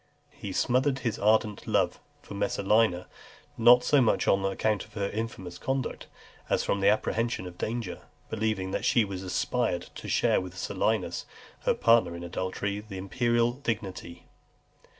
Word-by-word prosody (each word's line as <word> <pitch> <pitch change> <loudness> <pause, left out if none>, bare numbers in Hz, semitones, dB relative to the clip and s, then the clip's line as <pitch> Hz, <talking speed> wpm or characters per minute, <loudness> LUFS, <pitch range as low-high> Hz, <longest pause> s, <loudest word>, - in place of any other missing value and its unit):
He 100 - -7
smothered 130 +7 +1
his 115 - -1
ardent 105 -1 +2
love - - +1 0.2
for - - -10
Messalina, 100 -1 +1 0.5
not 120 +2 +6
so 145 +1 +4
much 115 - +2
on 95 0 +3
account 100 +1 0
of - - -18
her 100 -2 -2
infamous 105 -5 -5
conduct, 135 -1 -3 0.4
as - - +2
from 100 -1 -1
apprehension 110 +1 +1
of 90 0 -10
danger; 115 -4 -3 0.3
believing 105 -4 -2
that - - -2
she 120 - +4
aspired 95 +2 -2
to - - -8
share - - +3
with 90 0 -8
Silius, - - -1 0.4
her - - +3
partner 115 -7 +4
in 85 - -7
adultery, 95 +3 -3
the 105 -2 -9
imperial 120 +4 +1
dignity. 105 -9 -5
105 Hz, 145 wpm, -28 LUFS, 95-115 Hz, 0.5 s, not